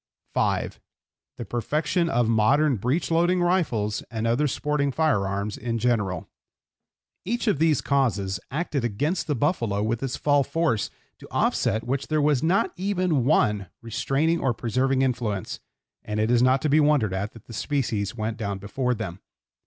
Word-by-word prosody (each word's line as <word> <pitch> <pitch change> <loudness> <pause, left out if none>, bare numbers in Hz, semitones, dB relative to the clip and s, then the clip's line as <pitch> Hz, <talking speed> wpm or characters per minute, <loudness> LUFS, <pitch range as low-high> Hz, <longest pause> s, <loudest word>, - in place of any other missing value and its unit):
(5) - - 0 0.6
The 120 - -5
perfection 155 +9 0
of 120 -6 +2
modern 130 +5 +3
breech 130 - -1
loading 175 +2 +3
rifles 160 - +1
and 110 0 -3
other 120 +6 +2
sporting 145 +1 0
fire 130 -10 +1
arms 100 +1 -3
in 115 -1 -2
general. 105 -7 0 1.0
Each 240 +6 -2
of 205 - +1
these 160 -4 +3
causes 100 -9 0
acted 145 -2 -2
against 145 - -1
the 150 - 0
buffalo 115 - 0
with 115 +1 -1
its 135 -2 -2
fall 145 -1 +3
force, 160 -8 0 0.3
to - - -12
offset 110 - +1
which 135 +3 -2
there 155 0 +1
was 145 -3 +2
not 170 +5 +1
even 180 -8 0
one 105 - +2 0.2
restraining 135 +8 0
or 125 -3 0
preserving 130 +4 +1
influence, 115 -7 -2 0.4
and 105 0 -3
it 110 +2 +1
is 120 -1 +4
not 130 +1 +3
to 155 - +1
be 150 +3 +5
wondered 145 -10 +3
at 100 +3 -3
that 115 - -15
the 115 - -11
species 110 -5 -1
went 110 0 -3
down 100 -3 -3
before 125 +6 -2
them. 100 -5 -6
125 Hz, 165 wpm, -25 LUFS, 110-150 Hz, 1.0 s, be